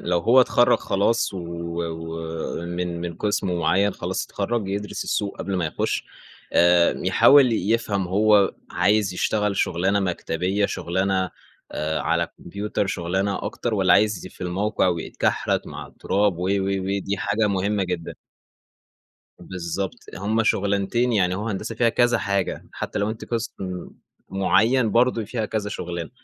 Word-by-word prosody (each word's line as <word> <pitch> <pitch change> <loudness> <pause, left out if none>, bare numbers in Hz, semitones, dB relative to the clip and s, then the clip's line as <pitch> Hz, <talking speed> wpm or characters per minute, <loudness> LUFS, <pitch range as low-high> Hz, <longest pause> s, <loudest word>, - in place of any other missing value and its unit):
لو 90 0 0
هو 120 +9 +5
اتخرّج 120 -1 +4
خلاص 100 +2 0
و - - -4 0.5
ومن 80 +2 -4
من 85 -1 -4
قِسم 95 -2 -1
معيّن 95 +4 +2
خلاص - - -3
اتخرّج، 115 -5 -2
يدرِس 100 +1 -3
السوق 100 -1 -2
قبل 100 -1 -2
ما 85 - 0
يخُش 75 - -2 0.5
آآ 85 0 +5
يحاول 135 -4 +6
يفهَم 105 -2 0
هو 105 +1 +4 0.2
عايز 105 -3 +2
يشتغل 105 +1 0
شغلانة 95 +4 +1
مكتبية 90 +2 -1
شغلانة، 95 +1 -1 0.4
آآ، 80 +1 -2
على - - 0
كمبيوتر 100 +2 -3
شغلانة 95 +3 -1
أكتر، 120 -2 -3
والّا 95 -3 +3
عايز 105 -3 +2
ي - - -7
في - - -20
الموقع 95 +3 0
ويتكحرت 85 -2 -1
مع - - -7
التراب 100 -2 0
و - - -5
و 95 +1 +1
ودي 100 0 -1
حاجة 100 +3 0
مهمة 100 +1 0
جدًا. 90 -2 -4 1.3
بالضبط، 95 +4 -4 0.2
هُم 105 +4 0
شغلانتين 100 +5 +1
يعني 90 -4 +2
هو 105 +4 -3
هندسة 105 +3 -4
فيها 115 +1 +3
كذا 120 0 +3
حاجة، 100 -1 -2
حتّى - - -4
لو 105 +2 0
أنتِ 110 - -6
قِسم 115 0 -2 0.8
معيّن 110 +5 +2
برضه 120 0 +2
فيها 110 0 -3
كذا 105 -1 -2
شغلانة، 85 -4 -5
100 Hz, 140 wpm, -23 LUFS, 90-105 Hz, 1.3 s, يحاول